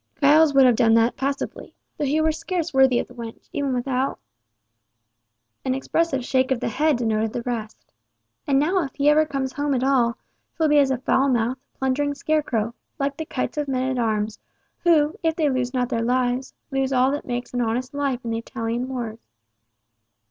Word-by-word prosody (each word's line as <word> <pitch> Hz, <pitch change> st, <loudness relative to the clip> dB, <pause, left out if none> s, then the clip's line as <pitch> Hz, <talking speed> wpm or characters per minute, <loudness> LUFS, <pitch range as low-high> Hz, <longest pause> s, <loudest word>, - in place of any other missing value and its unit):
Giles 300 Hz, +2 st, +6 dB
would 270 Hz, -1 st, +7 dB
have 245 Hz, -2 st, +5 dB
done 225 Hz, 0 st, +4 dB
that 230 Hz, +1 st, +3 dB
passably, 275 Hz, +2 st, -4 dB, 0.2 s
though 295 Hz, -, -2 dB
he 290 Hz, +3 st, +1 dB
were 315 Hz, 0 st, +3 dB
scarce 335 Hz, +1 st, -3 dB
worthy 265 Hz, -2 st, +5 dB
of -, -, -1 dB
the -, -, -15 dB
wench, 230 Hz, -2 st, -9 dB
even 280 Hz, -2 st, -1 dB
without—" 255 Hz, +1 st, -1 dB, 1.5 s
An 260 Hz, -1 st, 0 dB
expressive 270 Hz, -1 st, 0 dB
shake 260 Hz, 0 st, +1 dB
of 260 Hz, -3 st, +1 dB
the -, -, -2 dB
head 295 Hz, +3 st, +2 dB
denoted 220 Hz, -2 st, 0 dB
the 240 Hz, -, -3 dB
rest. 225 Hz, -3 st, -6 dB, 0.5 s
"And 275 Hz, -2 st, +3 dB
now 345 Hz, +6 st, +2 dB
if 270 Hz, -, -7 dB
he 285 Hz, 0 st, +3 dB
ever 310 Hz, +1 st, +4 dB
come 275 Hz, -3 st, -2 dB
home 285 Hz, +1 st, -1 dB
at 250 Hz, -, 0 dB
all, 250 Hz, -4 st, +2 dB, 0.4 s
'twill 320 Hz, -2 st, +2 dB
be 295 Hz, 0 st, +5 dB
as 275 Hz, -2 st, +4 dB
a 265 Hz, -, +1 dB
foul 265 Hz, +2 st, +2 dB
mouthed, 245 Hz, +1 st, 0 dB, 0.2 s
plundering 285 Hz, +2 st, 0 dB
scarecrow, 275 Hz, -7 st, -1 dB, 0.2 s
like 280 Hz, 0 st, -1 dB
the 320 Hz, -, -4 dB
kites 260 Hz, 0 st, -3 dB
of 295 Hz, -, -2 dB
men 260 Hz, -1 st, 0 dB
at -, -, -2 dB
arms, 215 Hz, -1 st, -1 dB, 0.4 s
who, 310 Hz, -3 st, +3 dB
if 325 Hz, -1 st, +1 dB
they 305 Hz, -4 st, +1 dB
lose 250 Hz, -1 st, -1 dB
not 250 Hz, -2 st, -1 dB
their 230 Hz, -, -1 dB
lives, 250 Hz, +2 st, 0 dB, 0.2 s
lose 270 Hz, 0 st, 0 dB
all 260 Hz, 0 st, +3 dB
that 290 Hz, -, -4 dB
makes 245 Hz, 0 st, -4 dB
an 245 Hz, -, 0 dB
honest 245 Hz, +3 st, -2 dB
life 275 Hz, -4 st, -2 dB
in 230 Hz, -, -2 dB
the 225 Hz, -, -1 dB
Italian 230 Hz, +2 st, -3 dB
wars. 235 Hz, -4 st, -4 dB
265 Hz, 200 wpm, -23 LUFS, 245-285 Hz, 1.5 s, would